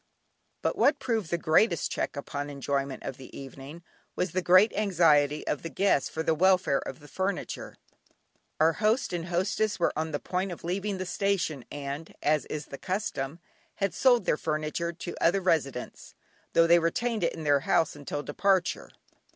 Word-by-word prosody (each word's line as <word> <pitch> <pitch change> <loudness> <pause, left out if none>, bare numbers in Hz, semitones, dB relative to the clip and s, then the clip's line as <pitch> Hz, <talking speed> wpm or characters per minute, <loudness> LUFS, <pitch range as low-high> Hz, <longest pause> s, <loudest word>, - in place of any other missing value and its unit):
But - - 0
what 290 - +4
proved 225 -9 -2
the 170 - 0
greatest 170 +2 +2
check - - -2
upon 145 0 -4
the 145 - -7
enjoyment 140 -1 -2
of 135 - -5
the 130 - -11
evening 140 +4 -10 0.3
was 180 -2 -1
the 185 - 0
great 185 +5 +5
anxiety 155 -7 +3
of 150 - -1
the 165 - -5
guests 155 -1 +2
for 160 - -3
the 160 - +2
welfare 180 -4 +3
of - - -7
the 145 - -13
furniture. 190 +4 -3 0.8
Our 160 +1 +5
host 215 +3 +1
and 170 -1 -3
hostess 190 +4 0
were 170 - +2
on 160 +1 -1
the 145 - -2
point 185 +1 -2
of 175 - -8
leaving 195 +3 -2
the 185 - -4
station, 175 -7 -1
and 145 +2 -6
as 150 0 +2
is 150 -1 -5
the 140 - -9
custom, 170 -7 -3 0.4
had 195 -4 -1
sold 245 -6 +4
their - - +2
furniture 155 +2 -2
to 175 +1 -7
the - - -6
other 180 +4 +4
residents, 155 -9 -2 0.4
though 165 - +6
they 170 +1 +6
retained 225 +5 -1
it 170 - +1
in 160 - -7
their 145 -1 +4
house 155 +3 +1
until 145 0 -5
departure. 190 +4 0
165 Hz, 185 wpm, -28 LUFS, 145-190 Hz, 0.8 s, though